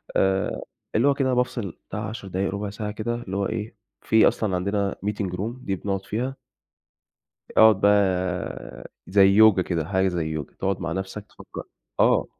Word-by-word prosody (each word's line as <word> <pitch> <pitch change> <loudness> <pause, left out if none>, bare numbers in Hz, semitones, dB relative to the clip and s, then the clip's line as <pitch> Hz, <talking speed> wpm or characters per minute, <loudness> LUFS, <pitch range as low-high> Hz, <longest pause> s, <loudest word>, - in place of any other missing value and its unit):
آآ 95 0 +1 0.3
اللي 120 +6 +4
هو 140 - +5
كده 135 -2 0
بافصِل 120 -7 -1 0.2
بتاع 105 +2 -4
10 110 -3 -7
دقايق، 95 +1 -1
رُبع 100 +1 -3
ساعة 105 0 -5
كده 110 +2 -3
اللي 100 -5 -5
هو 100 - 0
إيه، 110 0 -4 0.3
في 110 0 +5
أصلًا 100 -4 0
عندنا 100 +1 -1
meeting 105 -3 -2
room 115 +6 -5
دي 95 - 0
بنقعُد 95 +1 -3
فيها 125 +6 -3 1.2
أقعُد 110 -3 +6
بقى 90 -10 0 0.2
زي 100 0 +5
يوجا 105 -1 +6
كده، 85 -4 -2
حاجة 95 +2 +1
زي 85 -3 -2
يوجا، 80 -3 -5
تقعُد 95 -1 -2
مع 85 -2 -3
نفَسْك 95 +3 -5
تفكّر - - -10 0.4
آه. - - +4
100 Hz, 170 wpm, -24 LUFS, 95-110 Hz, 1.2 s, أقعُد